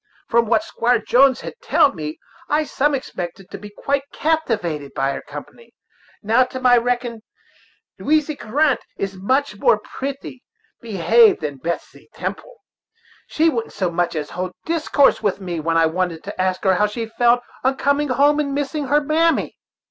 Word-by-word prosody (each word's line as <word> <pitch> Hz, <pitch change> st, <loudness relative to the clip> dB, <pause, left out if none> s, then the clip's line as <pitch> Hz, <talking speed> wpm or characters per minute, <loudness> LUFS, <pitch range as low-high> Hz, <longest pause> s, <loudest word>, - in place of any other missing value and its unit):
From 235 Hz, -1 st, +3 dB
what 235 Hz, +8 st, +2 dB
Squire 245 Hz, -7 st, +1 dB
Jones 255 Hz, +4 st, +3 dB
had -, -, -7 dB
telled 335 Hz, -11 st, +3 dB
me, 155 Hz, -1 st, -5 dB, 0.3 s
I 300 Hz, +1 st, +2 dB
some 290 Hz, 0 st, 0 dB
expected 185 Hz, -7 st, -6 dB
to -, -, -7 dB
be 210 Hz, +1 st, -9 dB
quite 275 Hz, +7 st, -1 dB
captivated 210 Hz, -, -1 dB
by 135 Hz, +1 st, 0 dB
her -, -, -5 dB
company. 470 Hz, -, -11 dB, 0.5 s
Now, 225 Hz, +5 st, +4 dB
to 260 Hz, +1 st, -7 dB
my 250 Hz, -1 st, +5 dB
reckoning, 240 Hz, -1 st, -1 dB, 0.8 s
Lowizy 305 Hz, 0 st, +1 dB
Grant 285 Hz, +4 st, +1 dB, 0.2 s
is 195 Hz, 0 st, -3 dB
much 260 Hz, +10 st, 0 dB
more 485 Hz, -, +4 dB
pritty 270 Hz, -1 st, -7 dB, 0.4 s
behaved 225 Hz, +1 st, +4 dB
than 145 Hz, -3 st, -4 dB
Betsey 170 Hz, +6 st, -6 dB
Temple. -, -, -5 dB, 0.7 s
She 320 Hz, +2 st, +2 dB
wouldn't 235 Hz, -8 st, -1 dB
so 185 Hz, -4 st, -1 dB
much 175 Hz, 0 st, -1 dB
as 150 Hz, -1 st, -4 dB
hold 180 Hz, +1 st, -4 dB
discourse 310 Hz, -3 st, +2 dB
with 205 Hz, -3 st, 0 dB
me 175 Hz, -4 st, -4 dB
when 165 Hz, +1 st, 0 dB
I 165 Hz, -, +5 dB
wanted 165 Hz, 0 st, -2 dB
to 200 Hz, -2 st, -5 dB
ask 185 Hz, 0 st, -1 dB
her 190 Hz, -2 st, +4 dB
how 210 Hz, +3 st, +2 dB
she 225 Hz, +2 st, -4 dB
felt 240 Hz, +2 st, +2 dB, 0.2 s
on 265 Hz, +1 st, +1 dB
coming 285 Hz, +2 st, +1 dB
home 285 Hz, +4 st, +3 dB
and 280 Hz, -2 st, -1 dB
missing 290 Hz, 0 st, -2 dB
her 295 Hz, +3 st, +3 dB
mammy." 320 Hz, +3 st, +1 dB
240 Hz, 170 wpm, -20 LUFS, 185-285 Hz, 0.8 s, my